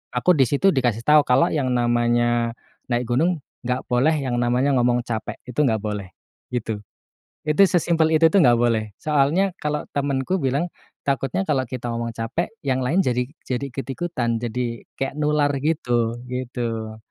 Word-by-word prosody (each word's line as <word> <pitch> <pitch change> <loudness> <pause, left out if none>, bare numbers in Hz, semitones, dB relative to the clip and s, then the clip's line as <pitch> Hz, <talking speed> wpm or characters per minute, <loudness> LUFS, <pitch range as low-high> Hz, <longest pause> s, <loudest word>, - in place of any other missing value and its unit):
aku 150 +9 +4
di 135 - +5
situ 190 +7 +3
dikasih 120 -4 0
tahu 150 0 +7
kalau 125 +5 +5
yang 140 -5 0
namanya 120 -1 +1 0.3
naik 120 +1 0
gunung, 160 +6 +1 0.2
nggak 125 +1 -1
boleh 135 +6 +3
yang 130 -4 -2
namanya 125 +3 +2
ngomong 120 0 +2
capek, 110 -2 -4
itu 125 +3 -1
nggak 110 -7 +2
boleh, 105 -3 -4 0.4
gitu. 110 -4 -3 0.7
Itu 150 +6 +5
sesimpel 165 -2 +2
itu 165 +1 +6
tuh 185 +2 +4
nggak 120 -2 +5
boleh. 110 -3 +1
Soalnya 155 +6 +2
kalau 150 0 -1
temenku 140 +4 0
bilang 135 +6 0 0.4
takutnya 135 +7 0
kalau 135 -4 +1
kita 125 0 -6
ngomong 115 0 -3
capek 115 +9 -3
yang 130 -1 +1
lain 160 +10 +1
jadi 125 -8 +1 0.2
jadi 135 +2 -3
ikut-ikutan, 135 -2 -2
jadi 120 0 -3 0.2
kayak 135 +1 -2
nular 150 -1 +2
gitu, 120 -7 0
gitu. 120 -3 -4
125 Hz, 160 wpm, -23 LUFS, 120-150 Hz, 0.7 s, tahu